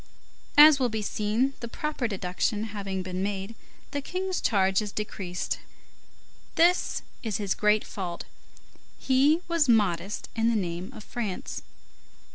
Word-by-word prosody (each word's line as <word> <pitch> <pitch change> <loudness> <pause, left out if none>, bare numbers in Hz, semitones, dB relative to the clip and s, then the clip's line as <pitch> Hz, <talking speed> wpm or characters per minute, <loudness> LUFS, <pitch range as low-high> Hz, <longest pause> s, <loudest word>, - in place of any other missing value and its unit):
As 295 -1 +9
will 250 -2 +2
be 220 -1 -3
seen, 220 +7 0
the 235 - -5
proper 300 0 -2
deduction 200 +2 -1
having 195 -2 -3
been 185 0 -4
made, 195 +1 -3 0.4
the 285 - -2
King's 370 +5 -3
charge 190 -2 +3
is 210 -1 -4
decreased. 195 -4 -3 1.0
This 350 +2 +3 0.2
is 220 -4 -2
his 200 -2 0
great 210 0 +2
fault; 175 -4 -5 0.7
he 280 +5 +3
was 335 -5 +2
modest 200 -4 +2
in 225 +1 +2
the 235 - +1
name 180 +1 -3
of 220 -5 -10
France. 215 -6 -4
215 Hz, 135 wpm, -27 LUFS, 190-260 Hz, 1.0 s, As